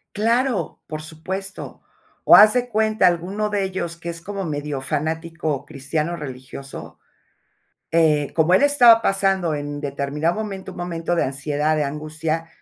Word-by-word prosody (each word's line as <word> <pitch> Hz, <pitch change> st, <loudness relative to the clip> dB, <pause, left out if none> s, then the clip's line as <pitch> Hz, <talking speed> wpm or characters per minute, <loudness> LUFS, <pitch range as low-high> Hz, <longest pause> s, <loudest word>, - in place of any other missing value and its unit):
Claro, 230 Hz, -, 0 dB
por 155 Hz, 0 st, -5 dB
supuesto. 190 Hz, +5 st, -6 dB, 0.4 s
O -, -, +8 dB
haz 210 Hz, +1 st, +8 dB
de 250 Hz, 0 st, 0 dB
cuenta 215 Hz, -3 st, +2 dB
alguno 190 Hz, +5 st, -1 dB
de 205 Hz, -1 st, 0 dB
ellos, 185 Hz, -3 st, -3 dB
que 170 Hz, 0 st, -7 dB
es 170 Hz, 0 st, -6 dB
como 200 Hz, +1 st, -5 dB
medio 145 Hz, -4 st, -4 dB
fanático 160 Hz, +1 st, -3 dB
cristiano, 155 Hz, +3 st, -3 dB
religioso, 135 Hz, -2 st, -9 dB, 0.9 s
eh, 155 Hz, -3 st, +2 dB
como 165 Hz, +2 st, +3 dB
él 230 Hz, -, +4 dB
estaba 245 Hz, -6 st, +6 dB
pasando 195 Hz, -4 st, +1 dB
en 145 Hz, 0 st, -5 dB
determinado 145 Hz, +3 st, -2 dB
momento 205 Hz, -3 st, -5 dB
un -, -, -12 dB
momento 175 Hz, -1 st, -2 dB
de 170 Hz, -, +1 dB
ansiedad, 145 Hz, +3 st, -1 dB
de 150 Hz, -, +1 dB
angustia, 155 Hz, +3 st, -3 dB
165 Hz, 145 wpm, -22 LUFS, 150-195 Hz, 0.9 s, O